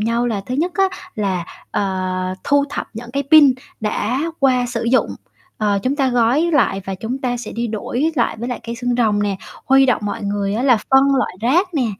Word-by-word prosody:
nhau 230 +2 0
là 215 -4 -1
thứ 255 - -3
nhất 340 +5 0
á 390 - +3 0.3
là, 190 -5 -1 0.3
ờ, 200 - 0 0.6
thu 285 0 +3
thập - - -4
những 235 +1 -8
cái 280 0 -1
pin 290 -5 +8 0.3
đã 220 +4 -1 0.2
qua 255 -2 +3
sử 235 -1 -3
dụng, 260 +3 +2 0.5
ờ, 205 -2 +1
chúng 270 +3 0
ta 270 -3 +2
gói 245 +7 +2
lại 205 -8 +2
và 195 - -4
chúng 230 +7 -4
ta 245 -2 -2
sẽ 240 - -7
đi 235 +1 -2
đổi 245 +8 -2
lại 235 -4 0
với 240 - -4
lại 245 - -4
cây 235 - -4
xương 245 0 -2
rồng 215 -4 +2
nè. 200 -2 -1 0.3
Huy 270 0 +5
động 240 -4 +1
mọi 205 - -3
người 200 0 -1
á 235 - -1
là 255 -4 +5
phân 270 +1 +5
loại 260 - -1
rác 340 - +1
nè 255 -5 +1
245 Hz, 220 wpm, -19 LUFS, 215-270 Hz, 0.6 s, pin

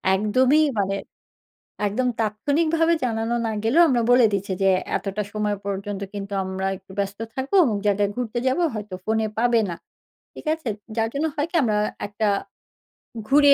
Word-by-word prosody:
একদমই 255 +9 +3 0.2
মানে 195 0 0 0.9
একদম 245 +5 0
তাৎক্ষণিকভাবে 310 +10 +2
জানানো 225 -1 -1
না - - -1
গেলেও 270 +10 +5
আমরা 245 -4 +2
বলে 245 -1 +7
দিচ্ছি 200 -1 -1
যে, 195 - +5 0.3
"এতটা 200 +1 -3
সময় 210 -1 -1
পর্যন্ত 200 0 -3
কিন্তু 200 0 -6
আমরা 190 0 -3
একটু 190 0 -16
ব্যস্ত 200 0 -2 0.2
থাকবো, 265 +6 -3
অমুক 220 -7 0
জায়গাতে 205 0 +2
ঘুরতে 245 -1 -2
যাবো। 260 +7 +2
হয়তো 210 -3 -5
ফোনে 220 0 +1
পাবে 235 0 +3
না।" 170 - -4 0.6
ঠিক - - -11
আছে? 320 -6 -7 0.3
যার 225 0 +1
জন্য 295 +3 0
হয় 295 +1 0
কি? - - -28
আমরা 215 -4 +1 0.3
একটা 210 +1 -1 1.0
ঘুরে 285 0 +7
220 Hz, 160 wpm, -23 LUFS, 200-260 Hz, 1.0 s, বলে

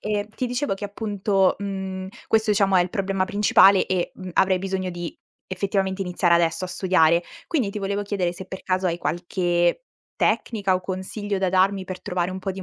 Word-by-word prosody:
ehm, 210 -1 -2
ti 255 - -2
dicevo 245 -1 -1
che 195 - -7
appunto, 200 -2 +1
mhmm, 190 -1 -4 0.2
questo 220 0 +2
diciamo 200 -2 +3
è 180 - +6
il 175 - -4
problema 195 -1 0
principale 200 -1 +5
e, 185 -2 -1
mhmm, 185 -1 -7
avrei 185 +1 +3
bisogno 190 0 -3
di 175 -1 -6 0.3
effettivamente 190 0 -1
iniziare 180 -1 +2
adesso 170 +1 +1
a - - -3
studiare. 175 -2 +3 0.2
Quindi 265 - 0
ti 210 - -5
volevo 200 +1 -2
chiedere 195 -4 -1
se 185 +1 -9
per 190 - -8
caso 185 0 0
hai 170 0 -2
qualche 175 - 0 0.3
tecnica 200 -5 +1
o 185 - 0
consiglio 190 +2 -4
da 190 -1 0
darmi 190 +1 +2
per 185 0 -7
trovare 180 0 -2
un 190 - -6
po' 195 - -3
di 190 0 -6
190 Hz, 195 wpm, -23 LUFS, 185-200 Hz, 0.3 s, è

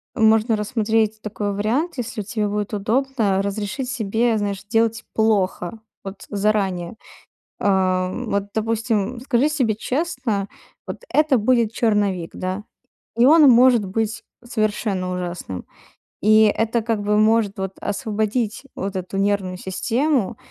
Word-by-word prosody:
можно 220 0 +4
рассмотреть 220 0 0
такой 205 -1 -3
вариант, 245 - -1
если 225 -3 -4
вот 195 - -10
тебе 210 -1 -1
будет 210 +1 -3
удобно- 215 -1 0
разрешить 205 +6 -3
себе, 225 -1 0
знаешь, 200 -2 -3
делать 225 +1 +1
плохо. 210 -2 0 0.2
Вот 195 0 -8
заранее. 195 -3 0 0.7
А, 185 -2 +2
вот, 200 -2 -2
допустим, 225 +1 -1
скажи 260 +2 +2
себе 255 -8 +1
честно: 250 - -2 0.4
вот - - -7
это 305 -3 +3
будет 230 0 +2
черновик, 205 -7 0
да. 185 +3 -4 0.5
И 235 +2 +5
он 305 0 +7
может 245 -2 +5
быть 225 +4 -2 0.2
совершенно 210 -5 -1
ужасным. 175 - -5 0.6
И 215 +1 +6
это 225 +2 +1
как 225 -2 -1
бы 210 0 +2
может 215 -1 +2
вот 190 0 -3
освободить 215 +2 -2
вот 195 +1 -4
эту 185 +1 -4
нервную 195 -2 0
систему, 235 +5 -1
215 Hz, 130 wpm, -21 LUFS, 200-235 Hz, 0.7 s, он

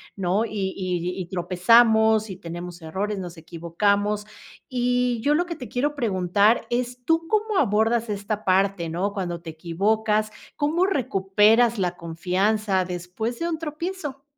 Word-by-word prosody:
¿no? 195 +3 0
Y 200 -4 -3
y 180 -1 -2
y 185 - -3
tropezamos 220 +4 +4
y 190 - -5
tenemos 175 -1 -8
errores, 200 +6 -3
nos 175 -2 -7
equivocamos. 200 +6 -1 0.4
Y, 245 -1 +1
yo 290 +4 +2
lo 350 +3 +1
que 335 - -4
te 250 -5 -8
quiero 290 +4 -1
preguntar 205 -1 +2
es, 245 +1 -2
¿tú 330 0 +1
cómo 430 0 0
abordas 225 - +2
esta 205 +1 -3
parte, 190 -2 +2
no? 180 +5 -2
Cuando 175 -4 -4
te 170 - -8
equivocas, 210 +7 0 0.3
¿cómo 320 +5 +2
recuperas 220 - +3
la 180 -1 -1
confianza 185 +4 0
después 180 +7 -4
de 335 - -1
un 325 - -2
tropiezo? 310 -2 -5
210 Hz, 145 wpm, -24 LUFS, 180-245 Hz, 0.4 s, tropezamos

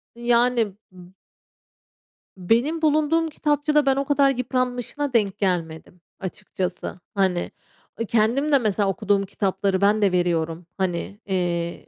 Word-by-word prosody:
Yani, 235 -3 +2 0.2
m 180 0 -15 1.2
Benim 240 - +1
bulunduğum 310 +2 +2
kitapçıda 295 -1 +1
ben 270 -1 +3
o 275 - -1
kadar 280 -1 +3
yıpranmışına 255 +2 -2
denk 205 -4 +1
gelmedim, 175 -2 -3 0.2
açıkçası. 185 -1 -5 0.2
Hani, 185 -3 0 0.5
ı - - 0
kendim 235 +7 +1
de, 280 - +6
mesela, 205 -3 +1
okuduğum 200 -1 +1
kitapları 195 0 -1
ben 210 +1 +3
de 200 - +3
veriyorum. 170 -2 0
Hani, 190 +1 -3
eee, 175 -3 -2
205 Hz, 120 wpm, -23 LUFS, 185-260 Hz, 1.2 s, de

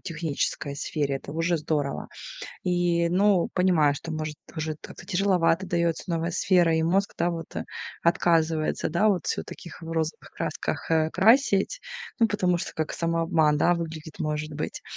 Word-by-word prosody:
технической 150 -3 -3
сфере. 140 -1 -1
Это 140 - -9
уже 165 +2 +1
здорово. 145 -2 -2 0.6
И, 175 -2 +2
ну, 190 0 +3
понимаю, 170 -6 +4
что, 165 +3 -6
может, 155 -1 -4 0.2
уже 155 -1 -2
как-то 175 - -11
тяжеловато 185 -2 +2
дается 170 -2 0
новая 170 0 -1
сфера, 175 -3 +3
и 160 - +2
мозг, 195 +4 +1
да, 175 +1 +2
вот, 165 -1 -6
э, - - -2 0.4
отказывается, 165 -2 +2
да, 175 +7 +3
вот 180 -6 +1
всё - - 0
в - - -19
таких 170 - -10
розовых 165 -1 -3
красках, - - -3
э, 160 -1 +3
красить. 225 - +4 0.4
Ну, 230 - +6
потому 180 -4 +1
что - - -4
как 160 -1 -2
самообман, 165 -2 +2
да, 175 +3 +4
выглядит, 160 -2 -6
может 150 0 -2
быть. 150 - -4
165 Hz, 160 wpm, -26 LUFS, 155-180 Hz, 0.6 s, Ну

